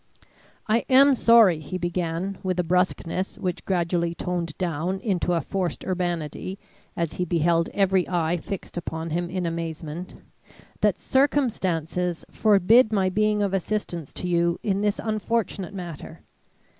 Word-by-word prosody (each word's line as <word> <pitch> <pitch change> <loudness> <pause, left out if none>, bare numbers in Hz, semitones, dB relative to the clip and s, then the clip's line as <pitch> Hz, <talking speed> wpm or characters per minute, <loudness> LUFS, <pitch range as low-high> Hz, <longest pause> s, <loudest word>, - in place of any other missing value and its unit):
"I 220 +2 +3
am 275 +2 +7
sorry," 230 -9 +6
he 155 +4 -5
began, 175 +2 -2
with 185 -1 -2
a - - +3
brusqueness 180 +1 0
which 180 -2 -3
gradually 170 -2 0
toned 170 -3 -3
down 180 +1 -2
into 185 -4 0
a 170 - +1
forced 185 -2 -3
urbanity 175 0 -3 0.4
as 170 -2 -1
he 180 - -2
beheld 170 -1 +1
every 190 -2 +1
eye 175 -1 +1
fixed 180 +2 -7
upon 165 -1 -4
him 175 +2 -1
in 185 -1 -2
amazement, 165 0 -5 0.6
"that - - +2
circumstances 180 - 0
forbid 215 +3 +5
my 195 -3 +2
being 210 +1 +1
of 195 -1 -1
assistance 185 -5 -2
to 180 - -4
you 170 0 +2
in 200 -2 0
this 205 0 +1
unfortunate 215 -3 -2
matter. 175 -5 -8
180 Hz, 140 wpm, -25 LUFS, 170-200 Hz, 0.6 s, am